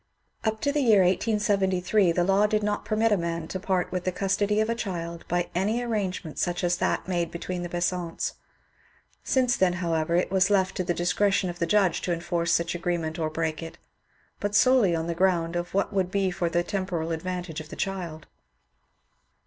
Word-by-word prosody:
Up 220 -1 0
to 285 - +1
the 295 0 +1
year 215 -7 +5
1873 190 -1 +2
the 175 +1 +1
law 195 +3 +3
did 215 0 0
not 210 0 -1
permit 215 +1 +1
a 205 - +4
man 170 -2 -3
to 185 - -3
part 185 -2 -1
with 180 -1 -2
the 185 - 0
custody 200 +3 0
of 220 - +2
a 230 - +1
child 170 -6 -5
by 175 0 0
any 205 +6 0
arrangement 200 -9 -3
such 175 +1 -1
as 175 0 +2
that - - -1
made 175 -2 0
between 175 +1 -5
the 175 - -4
Besants; 175 -1 -2 0.9
since 250 -2 +2
then, 185 -2 +2
however, 170 -2 0
it 180 - +1
was 190 0 +3
left 190 -2 +2
to 185 - 0
the 175 -1 -1
discretion 185 +2 +1
of 175 - -13
the 170 - 0
judge 190 -2 +2
to 180 - -2
enforce 170 0 -1
such 170 0 +1
agreement 170 -1 -2
or 160 -1 0
break 160 0 -2
it, 165 0 -8 0.6
but 205 0 -2
solely 235 -6 +5
on 160 0 -2
the 170 - -2
ground 170 -1 +1
of 175 +1 -3
what 200 - +1
would 190 -2 +1
be 195 -1 0
for 175 -1 -1
the 175 +1 +1
temporal 180 -4 -2
advantage 175 -1 -4
of 155 - -12
the - - -8
child. 175 -5 -4
180 Hz, 200 wpm, -26 LUFS, 170-200 Hz, 0.9 s, year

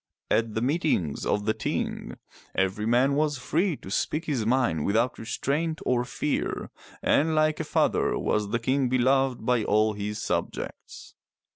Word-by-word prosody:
At 115 -1 +1
the 110 - 0
meetings 130 - 0
of 105 - 0
the 110 - +2
Ting, - - -3 0.4
every 95 +3 0
man 125 +4 +3
was 145 0 +1
free 160 +6 0
to 95 - -10
speak 155 +10 -1
his 130 -9 -1
mind 120 - +2
without 115 +5 +1
restraint 150 +8 -2
or 125 -1 +2
fear, 125 +4 -2 0.3
and 160 +2 +3
like 155 0 +2
a - - 0
father - - +1
was 105 -1 0
the 115 - +1
King 130 +2 +1
beloved 130 -1 +2
by 125 -2 +2
all 110 +1 +2
his 105 +1 -4
subjects. - - -4
125 Hz, 155 wpm, -27 LUFS, 110-145 Hz, 0.4 s, man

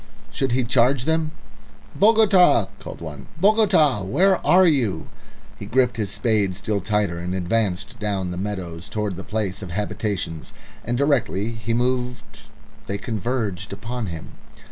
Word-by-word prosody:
Should 135 -3 -1
he 130 +1 +2
charge 125 +2 +2
them? 160 -1 +1 0.7
"Bogota!" 200 - +5
called - - -9
one. 75 -4 -8
"Bogota! 190 - +4
where 180 - +2
are 185 +1 +6
you?" 120 - +1 0.5
He 100 - -7
gripped 125 +1 +2
his 105 -3 -2
spade 105 -6 0
still 100 +1 -2
tighter, 100 -3 0
and 90 +2 -3
advanced 95 +3 -1
down 100 -4 -2
the - - -4
meadows 90 -3 -5
towards 105 -3 -2
the 95 - -7
place 105 -2 -3
of 95 - -7
habitations, 100 -3 -3 0.3
and 120 +2 -2
directly 125 -7 +1
he 115 0 -3
moved 125 0 -2 0.5
they 100 - -2
converged 105 -3 -3
upon 115 +3 -5
him. 80 -3 -7
110 Hz, 145 wpm, -23 LUFS, 95-130 Hz, 0.7 s, are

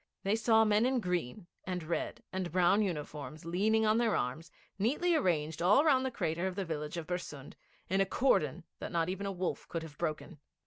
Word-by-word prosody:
They 200 +2 +2
saw 225 0 +4
men 215 +3 +3
in 260 -1 +1
green, 180 - -2 0.2
and 180 -2 -3
red, 165 +2 -3
and 185 -3 -2
brown 180 +4 +4
uniforms, 150 -5 -4
leaning 215 +6 +2
on 215 +1 +3
their 230 -3 +2
arms, 135 +7 -2 0.3
neatly 295 - +2
arranged 160 - 0
all 210 - +5
round 265 -4 +4
the - - -1
crater 170 -6 -1
of 185 - -4
the 195 -1 -2
village 150 0 -4
of 165 - -4
Bersund, 155 -5 -5 0.3
in 190 +2 +2
a - - +4
cordon 175 - +1 0.2
that - - -5
not 170 -1 0
even 195 +2 -3
a - - -1
wolf 185 -1 -3
could 165 -2 -4
have 150 -3 -11
broken. 155 +1 -3
180 Hz, 200 wpm, -32 LUFS, 160-215 Hz, 0.3 s, all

